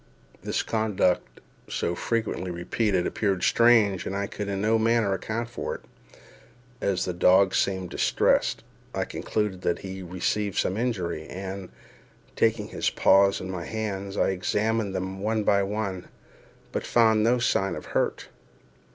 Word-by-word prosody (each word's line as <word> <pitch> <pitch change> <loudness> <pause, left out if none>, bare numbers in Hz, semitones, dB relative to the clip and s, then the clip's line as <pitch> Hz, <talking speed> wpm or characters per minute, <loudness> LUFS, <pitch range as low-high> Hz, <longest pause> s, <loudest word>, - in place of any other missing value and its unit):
This - - -1
conduct, 105 -5 0 0.3
so 85 - -1
frequently 110 -2 -2
repeated, 90 +2 0
appeared 100 -4 -1
strange, 115 -5 +4
and 95 - -3
I 100 0 -1
could 105 +1 -5
in 100 -1 -2
no 110 +2 +2
manner 115 -3 +2
account 110 +5 -3
for 120 - -4
it. - - -10 1.0
As 95 -2 0
the 90 - -2
dog 95 +2 +4
seemed 95 -2 0
distressed, - - +2 0.3
I - - 0
concluded 105 -4 -2
that 85 - 0
he 95 0 -6
had 90 -2 -9
received 100 +2 -1
some 95 - +1
injury; 95 -9 -2
and, 95 0 -6 0.7
taking - - +1
his - - 0
paws 100 0 +4
in 95 - -5
my 90 -3 -5
hands, 100 -3 -4
I - - +3
examined 105 +2 0
them 95 +1 -3
one 110 +2 0
by 100 -1 +3
one, 100 -2 -3 0.6
but - - -2
found 110 -2 +4
no 120 +3 +4
sign 100 -5 +1
of 75 - -8
any - - -11
hurt. - - -1
100 Hz, 155 wpm, -26 LUFS, 95-110 Hz, 1.0 s, strange